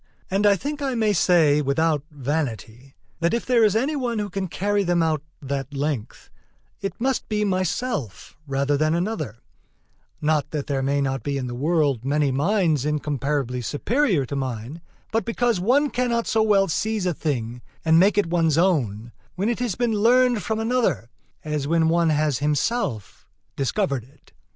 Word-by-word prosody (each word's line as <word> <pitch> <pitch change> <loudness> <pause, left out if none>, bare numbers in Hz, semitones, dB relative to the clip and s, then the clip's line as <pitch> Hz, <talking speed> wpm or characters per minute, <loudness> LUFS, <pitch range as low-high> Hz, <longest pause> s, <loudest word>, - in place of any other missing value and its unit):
And 200 +2 +3
I 200 - +5
think 290 +8 -5
I 270 -3 -1
may 220 -2 +2
say 160 -5 +4
without 150 +1 +1
vanity, 135 -3 -4 0.2
that 170 +6 +1
if 235 - -3
there 245 -3 +3
is 210 -2 +3
any 270 +7 +1
one 245 -4 -2
who 205 -2 -3
can 190 0 -3
carry 205 +4 0
them 175 -2 +2
out 155 -2 0 0.2
that 140 +1 -4
length, 140 -5 -4 0.5
it 195 +3 -4
must 260 +1 -1
be 210 -1 0
myself 185 - -2
rather 140 +1 0
than 155 +2 +1
another: 175 - -3 0.8
not 150 -1 +1
that 150 -3 -3
there 135 -2 -1
may 140 +1 +1
not 135 -2 -1
be 140 +4 -2
in 130 - -3
the 120 - -5
world 145 -2 +1
many 145 +1 +1
minds 155 - +1
incomparably 145 -3 -1
superior 185 - 0
to 140 - -5
mine, 130 +3 -4 0.3
but 225 +1 +1
because 230 -2 0
one 265 +9 +2
cannot 235 -1 0
so 220 - +1
well 205 -3 +3
seize 215 +4 -1
a 180 - +1
thing 125 -6 -3 0.2
and 160 0 +5
make 200 +3 +4
it 205 - +4
one's 165 -2 +1
own, 120 - +1 0.2
when 195 +5 0
it 240 - -1
has 240 -7 -1
been 240 -2 0
learned 240 +2 +3
from 220 +1 -2
another, 225 - 0 0.3
as 150 -2 -2
when 165 0 +2
one 170 0 +3
has 150 -3 +1
himself 145 - -2 0.3
discovered 140 - -1
it. 135 +3 -23
160 Hz, 175 wpm, -23 LUFS, 140-210 Hz, 0.8 s, I